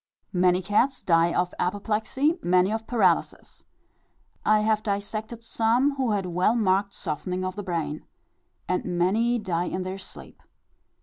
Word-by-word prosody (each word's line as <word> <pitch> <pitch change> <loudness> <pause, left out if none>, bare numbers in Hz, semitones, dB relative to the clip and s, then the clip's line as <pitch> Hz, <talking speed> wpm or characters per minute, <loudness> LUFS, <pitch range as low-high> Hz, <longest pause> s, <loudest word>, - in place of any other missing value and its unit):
Many 180 0 +3
cats 235 +7 +1
die 165 -1 +3
of 180 +1 0
apoplexy, 220 - 0
many 180 +2 +3
of 220 0 -3
paralysis. 195 -8 0 0.8
I 215 0 +4
have 215 0 +2
dissected 215 +2 -4
some 235 +5 +1
who 255 -5 +1
had 200 -2 -1
well 180 +5 +1
marked 200 -2 +1
softening 180 +3 -3
of 185 0 -4
the 205 - -4
brain. 165 -5 -4 0.6
And 180 - 0
many 225 +7 +2
die 180 -5 -1
in 185 +1 -3
their 185 +1 -5
sleep. 190 - -10
200 Hz, 140 wpm, -26 LUFS, 180-225 Hz, 0.8 s, I